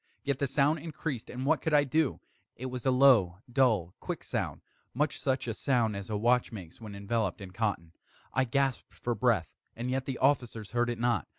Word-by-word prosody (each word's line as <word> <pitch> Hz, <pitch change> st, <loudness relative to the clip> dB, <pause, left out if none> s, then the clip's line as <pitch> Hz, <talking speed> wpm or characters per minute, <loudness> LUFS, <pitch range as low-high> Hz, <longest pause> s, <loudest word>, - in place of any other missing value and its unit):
Yet 140 Hz, -2 st, -1 dB
the 140 Hz, -, +1 dB
sound 150 Hz, +4 st, +2 dB
increased 150 Hz, -5 st, -5 dB
and 125 Hz, +1 st, -4 dB
what 155 Hz, +2 st, +3 dB
could 160 Hz, -2 st, +1 dB
I 145 Hz, -, +6 dB
do? 145 Hz, 0 st, 0 dB, 0.3 s
It 130 Hz, -, -7 dB
was 125 Hz, +1 st, -3 dB
a -, -, +6 dB
low, 125 Hz, -9 st, +5 dB
dull, 110 Hz, -9 st, +2 dB
quick -, -, -5 dB
sound -, -, -3 dB, 0.3 s
much 150 Hz, +2 st, 0 dB
such 130 Hz, -2 st, 0 dB
a 115 Hz, -, -1 dB
sound 115 Hz, -3 st, +1 dB
as 100 Hz, +1 st, -6 dB
a 105 Hz, -, -1 dB
watch 120 Hz, +4 st, +2 dB
makes 95 Hz, -3 st, -9 dB
when 105 Hz, -2 st, -8 dB
enveloped 100 Hz, -1 st, -1 dB
in 95 Hz, -2 st, -8 dB
cotton. 95 Hz, -5 st, -2 dB, 0.4 s
I 130 Hz, +1 st, +2 dB
gasped 135 Hz, +1 st, -1 dB
for 120 Hz, -, -2 dB
breath 115 Hz, -9 st, +1 dB, 0.2 s
and 120 Hz, +2 st, -3 dB
yet 130 Hz, 0 st, -1 dB
the 135 Hz, -3 st, -3 dB
officers 120 Hz, -6 st, +1 dB
heard 120 Hz, 0 st, +1 dB
it 120 Hz, -, -2 dB
not. 120 Hz, 0 st, +1 dB
120 Hz, 205 wpm, -30 LUFS, 110-135 Hz, 0.4 s, I